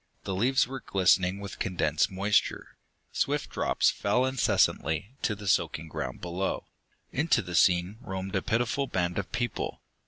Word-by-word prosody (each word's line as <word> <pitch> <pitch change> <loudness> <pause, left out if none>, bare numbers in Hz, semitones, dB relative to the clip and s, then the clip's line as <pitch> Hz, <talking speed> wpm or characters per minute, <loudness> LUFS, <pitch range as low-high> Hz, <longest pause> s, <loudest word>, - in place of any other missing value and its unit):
The 95 - -3
leaves 125 +8 +3
were 135 +1 -5
glistening 95 -2 +2
with 100 -2 -8
condensed 90 -2 +1
moisture; 100 +2 0 0.4
swift - - -1
drops - - +2
fell 125 +6 +1
incessantly 115 - +1
to 110 - 0
the 100 0 -8
soaking 80 -3 +1
ground 65 -4 -5
below. 90 +2 -2 0.5
Into 155 -2 +2
the 90 -1 -7
scene 90 +4 +3
roamed 95 0 -5
a 95 - +2
pitiful 120 +4 0
band 90 -3 -1
of 100 - -5
people. 120 -2 -3
100 Hz, 150 wpm, -28 LUFS, 90-120 Hz, 0.5 s, leaves